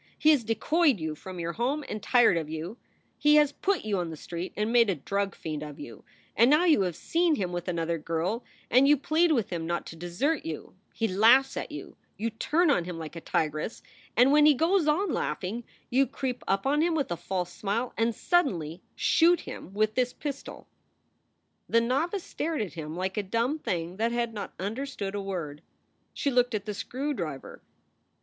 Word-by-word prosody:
He 310 - +5
has 285 -6 +3
decoyed 275 - +2
you 160 -1 -3
from 180 +4 -9
your 170 0 -3
home 275 +5 -1
and 215 - -5
tired 240 -6 +4
of 160 -2 -2
you; 160 +8 -5 0.4
he 295 0 +5
has 295 -2 +5
put 380 - -1
you 205 -3 0
on 175 -2 -2
the 160 - -7
street 170 +3 -6
and 215 +2 0
made 235 -3 +5
a 190 - +1
drug 195 +7 -2
fiend 155 -2 -5
of 150 -2 -8
you, 115 -7 -10 0.3
and 235 +4 +5
now 305 +5 +5
you 315 - +5
have 180 -3 -1
seen 335 - +1
him 185 -7 -2
with 175 0 -4
another 170 -1 -1
girl, 165 +9 -2 0.3
and 260 +3 +6
you 295 +1 +6
plead 320 +5 +2
with 235 -11 +1
him 165 -2 -3
not 170 0 -2
to - - -9
desert 175 - -1
you; 160 -2 -6 0.2
he 225 - -1
laughs 230 +8 +5
at - - -4
you; - - -8 0.2
you 230 +2 -2
turn 310 +9 +2
on 175 -11 +1
him 180 -1 -5
like 160 0 -7
a 165 - -6
tigress 155 +8 -2 0.3
and, 250 +3 +6
when 300 +1 +6
he 300 - +6
goes 330 +3 +2
on 320 +3 +2
laughing, 185 +11 -2 0.3
you 265 +2 +4
creep 255 -2 -4
up 195 0 +1
on 290 +3 +2
him 335 0 +2
with 285 - -1
a - - +1
false 180 0 -3
smile 225 +5 -2
and 230 0 +1
suddenly 180 - 0
shoot 340 +1 +4
him - - -9
with 215 +2 +1
this 250 +1 0
pistol." 280 -2 -7 1.0
The 230 - +5
novice 310 - 0
stared 315 -7 -2
at 195 - -7
him 160 -2 -6
like 190 +2 -3
a - - +2
dumb 230 +9 -1
thing 175 - -3
that 230 +2 +1
had 235 -1 -1
not 205 -2 -6
understood 205 0 -4
a 205 - -2
word. 170 -7 -5 0.5
She 280 - -1
looked 245 -2 +2
at 205 -1 -3
the 210 - -3
screw 270 +8 -3
driver. 155 - -6
220 Hz, 205 wpm, -28 LUFS, 175-280 Hz, 1.0 s, and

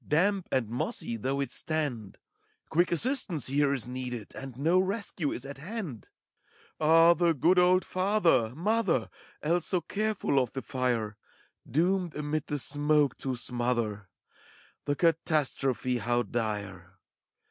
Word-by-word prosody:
Damp 190 +4 +2
and 130 -4 +1
mossy 120 0 -3
though 135 +5 -2
it 135 -3 -3
stand: 140 -12 -3 0.5
Quick 175 +2 +2
assistance 180 - 0
here 140 +1 +2
is 135 -6 -2
needed, 125 -3 -5
A.nd 135 -3 -8
no 165 +6 +3
rescue 190 -5 -1
is 125 - -5
at 140 0 -8
hand 170 - -6 0.7
I 155 - 0
A 165 +1 +7
h, 170 - +1
the 170 -1 +4
good 175 +7 +4
old 180 +1 +4
father, 180 - +2
mother, 185 - +1 0.3
Else 170 +2 +1
so 185 - +2
careful 205 -6 0
of 125 -3 -1
the 135 - -4
fire, 120 -5 -1 0.5
Doomed 180 +2 +1
amid 150 0 -2
the 150 - -2
smoke 145 +1 +2
to 130 -2 -2
smother! 120 -5 -2 0.4
— - - -28
The 145 - 0
catastrophe 140 -6 +1
how 120 +2 +1
dire! 100 -6 -4
145 Hz, 145 wpm, -29 LUFS, 125-175 Hz, 0.7 s, A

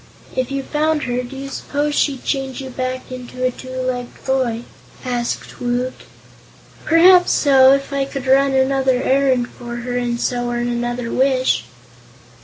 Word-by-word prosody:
"If 255 -1 -1
you 275 0 -3
found 305 +1 0
her, 245 0 -1
do 250 +2 -9
you 275 0 -6
suppose 290 +2 -2
she'd 280 -3 0
change 270 -2 -2
you 265 -1 -6
back 255 0 -4
into 255 0 -7
a 255 - +2
two 255 +1 -11
legged 255 -1 -4
boy?" 255 -3 0 0.4
asked 245 -1 -3
Woot. 245 +1 -1 0.9
"Perhaps 355 +2 +6
so, 270 -2 +6
if 275 0 -1
I 275 -1 0
could 270 -1 -6
run 270 +1 +4
another 265 -1 +2
errand 260 -2 +2
for 240 0 -8
her 245 +1 -4
and 240 -1 -1
so 245 0 -1
earn 240 0 -1
another 240 0 -2
wish." 260 - +2
255 Hz, 160 wpm, -19 LUFS, 245-275 Hz, 0.9 s, Perhaps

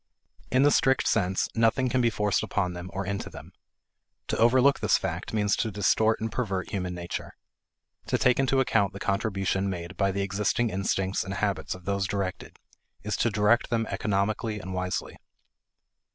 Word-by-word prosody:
In 130 +2 +3
the 145 - +5
strict 130 -1 +3
sense, 95 -4 +1
nothing 115 +3 +2
can 125 +1 +1
be 120 - +3
forced 105 -3 0
upon 90 -3 -1
them 90 +1 -7
or 95 +2 -3
into 100 +1 -3
them. - - -11 0.8
To - - 0
overlook 130 +4 +5
this - - +3
fact - - -4
means 105 -2 +1
to 110 - 0
distort 110 +2 +2
and 110 0 -3
pervert 100 -6 -2
human 90 -3 -3
nature. 85 0 -6 0.7
To - - +1
take 125 0 +3
into 135 0 +2
account 100 -7 +2
the 100 - -8
contribution 100 -1 -1
made 90 -1 -6
by 100 -1 +2
the 100 +1 -1
existing 105 +4 0
instincts 95 0 -1
and 95 0 -5
habits 100 -7 -1
of 90 -1 -14
those 100 -1 0
directed 100 -2 -4 0.5
is - - -2
to - - +2
direct 105 +3 +2
them 115 -1 0
economically 105 +2 -1
and 95 -1 -7
wisely. 90 0 -3
100 Hz, 175 wpm, -27 LUFS, 95-115 Hz, 0.8 s, the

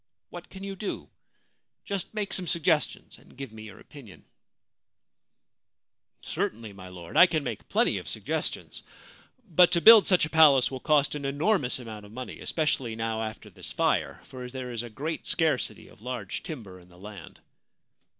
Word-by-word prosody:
What - - -9
can 190 0 -10
you 195 0 -5
do? 200 +1 -5 0.8
Just 195 -2 -3
make 210 -2 -2
some 180 -2 -1
suggestions 165 -3 0
and - - -20
give 135 -4 -7
me 110 0 -10
your 105 - -12
opinion/ 130 -10 -14 1.4
* - - -54
Certainly, 110 -1 -4
my 95 -1 -11
Lord, 90 -2 -10
I 180 - +9
can 155 -4 -1
make 120 -6 -6
plenty 230 +4 +2
of - - -9
suggestions; - - -3 0.7
but 175 0 +5
to 170 - +4
build 220 +3 +9
such 180 -4 +4
a - - -7
palace 145 -6 +6
will 130 - -5
cost 150 -1 +2
an 150 -1 -5
enormous 145 0 +1
amount 110 -4 -9
of - - -16
money, 125 +2 -7
especially 135 -7 -1
now 110 0 -2
after 110 0 -6
this - - -7
fire, - - 0
for 125 -1 -9
there 125 -1 -6
is 115 -2 -3
a 120 - -8
great 150 +8 -5
scarcity 160 -6 0
of - - -19
large 120 -5 -5
timber 105 - -8
in 90 0 -19
the 90 - -18
land.' 100 -2 -11
130 Hz, 175 wpm, -27 LUFS, 110-165 Hz, 1.4 s, I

